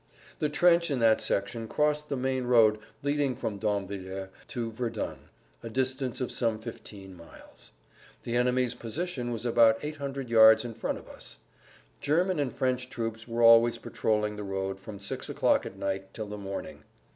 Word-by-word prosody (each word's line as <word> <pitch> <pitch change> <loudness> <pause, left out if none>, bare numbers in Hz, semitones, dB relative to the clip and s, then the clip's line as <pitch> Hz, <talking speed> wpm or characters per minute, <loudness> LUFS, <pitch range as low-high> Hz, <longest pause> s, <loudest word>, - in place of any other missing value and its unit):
The 150 - +1
trench 170 +2 +4
in 140 - 0
that 115 -2 +4
section 115 +3 -1
crossed 150 +3 0
the 140 - -1
main 130 0 -1
road 115 -3 +5 0.2
leading 145 -2 0
from 105 -3 -4
Damvillers 95 -2 -3 0.2
to 115 -2 -4
Verdun 115 +1 -4 0.3
(a 115 - -7
distance 130 +1 -1
of 125 - -2
some 115 -3 0
fifteen 105 -4 -10
miles). 85 -1 -15 0.5
The 120 - -3
enemy's 125 0 +2
position 130 +1 -4
was 120 0 -4
about 115 -2 +5
800 140 -3 -4
yards 110 0 +7
in 120 - -5
front 115 - -3
of - - -13
us. - - -11 0.6
German 175 +3 +1
and 140 -4 0
French 130 +1 -1
troops 115 -2 -4
were 115 0 -1
always 115 0 +7
patroling 105 -1 -1
the 105 - -5
road 95 0 -3
from 100 +1 -9
six 100 0 -4
o'clock - - +2
at - - -10
night 95 0 -4
till 110 - -4
the 105 - -6
morning. 100 -1 -6
115 Hz, 170 wpm, -28 LUFS, 105-130 Hz, 0.6 s, yards